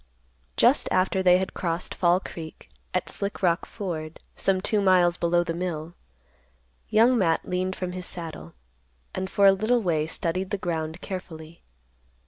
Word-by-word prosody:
Just - - +4
after 185 +1 +2
they 180 -1 +6
had 190 0 -3
crossed 170 0 -3
Fall 175 0 +3
Creek 160 - -10 0.2
at - - -1
Slick 200 0 -4
Rock 170 -1 +2
Ford, 165 -6 -5 0.2
some 190 -1 +1
two 205 +2 0
miles 180 -3 +4
below 175 0 +2
the 165 - -3
mill, 170 -2 -4 1.0
Young 230 +4 +5
Matt 165 -4 +1
leaned 185 +1 -1
from 185 -1 -4
his 180 -1 -5
saddle, 160 - -7 0.6
and 190 0 -3
for 200 - +3
a 195 - +8
little 220 +4 +1
way 160 -4 +1
studied 185 +3 -2
the 205 - -1
ground 165 -2 -3
carefully. 170 -4 -8
180 Hz, 155 wpm, -26 LUFS, 165-190 Hz, 1.0 s, a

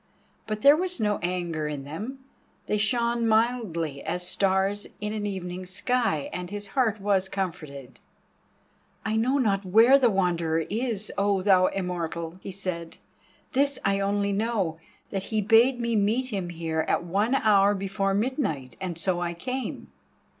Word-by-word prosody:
But 215 -1 -4
there 285 +1 +8
was 360 -1 -1
no 210 -2 +1
anger 175 -3 -2
in 145 -2 -4
them, 220 - -7 0.4
they 210 - 0
shone 235 +1 +1
mildly 220 - 0
as 180 0 -3
stars 195 +2 +1
in 210 0 -3
an 210 -1 -2
evening 185 -2 -5
sky, 190 - 0
and 180 -1 -5
his 205 0 -6
heart 225 -3 +1
was 195 -1 +1
comforted. 155 -9 -5 1.1
"I 220 0 0
know 250 +5 +2
not 205 -7 +1
where 225 +8 +6
the 250 -3 +4
Wanderer 170 -5 +1
is, 220 -2 -2
O 200 -1 +1
thou 185 -2 +5
Immortal," 170 -2 -4
he - - -6
said. 180 -3 -4 0.5
"This 280 +1 +2
I 195 0 +2
know - - 0
only, 200 0 0 0.8
that 195 -2 -2
he 220 - -1
bade 230 +5 +4
me 235 -1 0
meet 220 +5 +1
him 195 -6 -3
here 160 -2 -2
at - - +1
one 205 +9 +1
hour 205 -4 +4
before 195 0 -1
midnight, 205 - -2
and 180 -3 -4
so 175 +1 0
I 170 -1 -2
came." 255 +7 -5
200 Hz, 155 wpm, -26 LUFS, 175-225 Hz, 1.1 s, there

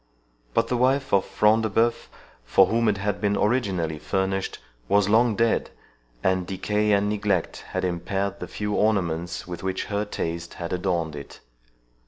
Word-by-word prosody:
But - - +3
the 125 - 0
wife 135 +2 +1
of 100 - +4
Front 110 +1 +3
de 110 - 0
Bœuf, 115 +3 +1 0.4
for 95 +10 +5
whom 115 +2 +2
it 105 - +1
had 100 0 -2
been 100 -1 +1
originally 95 -9 0
furnished, 95 +1 -1 0.3
was 100 -1 +4
long 115 +1 +4
dead, 115 0 +1 0.5
and 95 -1 +1
decay 105 +2 0
and 100 0 +3
neglect 100 -4 0
had - - -2
impaired 95 +3 -2
the - - -5
few 105 0 -3
ornaments 90 -6 0
with 90 -1 -7
which 95 0 -2
her 100 +1 +1
taste 85 -4 -4
had 85 0 -5
adorned 85 -4 -1
it. 70 -3 -10
100 Hz, 165 wpm, -25 LUFS, 90-105 Hz, 0.5 s, for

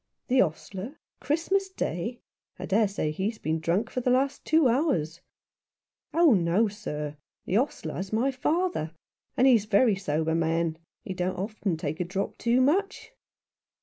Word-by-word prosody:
" - - -55
The 260 +1 +5
ostler? 195 - -3 0.2
Christmas 340 +8 0
Day? 230 - -3 0.4
I - - -5
dare 210 +2 +3
say 195 -6 -2
he's 200 +8 -2
been 160 -4 -2
drunk 170 +7 0
for 255 - -2
the 250 - 0
last 265 +3 +1
two 315 -3 +4
hours." 180 - 0 0.5
" - - -56
Oh 335 -6 +7
no, 185 +4 +3
sir. 150 -8 -5 0.3
The 190 - +1
ostler's 190 - -3
my 235 +5 +1
father, 300 - -1 0.4
and 255 - +4
he's 235 -6 +5
a - - -26
very 215 +1 +4
sober 160 -4 -1
man. 165 0 0 0.2
He 190 - -5
don't 180 0 -2
often 195 -2 -2
take 155 0 -4
a - - +1
drop 190 +3 -4
too 240 +2 +3
much." 390 - 0
205 Hz, 165 wpm, -27 LUFS, 170-255 Hz, 0.5 s, Oh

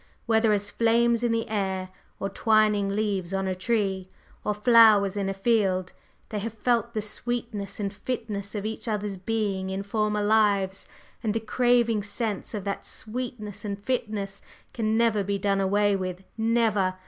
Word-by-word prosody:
Whether 225 -1 +3
as 205 0 0
flames 235 0 +3
in 240 -1 +1
the 230 0 0
air, 190 -3 -2 0.3
or 195 - -1
twining 210 0 +2
leaves 195 -3 -1
on 195 0 -1
a 190 - 0
tree, 190 -2 -1 0.3
or - - 0
flowers 210 -3 +6
in 200 -1 -1
a - - -1
field, 195 -4 +1 0.4
they 210 - -3
have 225 +2 -5
felt 235 +1 0
the 215 - -1
sweetness 220 -2 -4
and 200 -1 -2
fitness 210 -3 -4
of 205 0 -3
each 220 +2 -4
other's 210 -2 -2
being 195 -1 -2
in 190 +1 -3
former 210 0 0
lives, 205 -3 +2 0.3
and 220 -2 -1
the - - +2
craving 235 0 +2
sense 205 +1 -3
of 205 - -4
that 200 0 -3
sweetness 220 -3 -6
and 200 -2 -3
fitness 205 -3 -3 0.3
can 220 -1 0
never 225 -3 +3
be 200 +1 -1
done 195 0 +1
away 205 +1 +2
with, 185 -1 -4
never! 220 -4 +2
210 Hz, 165 wpm, -26 LUFS, 195-225 Hz, 0.4 s, flowers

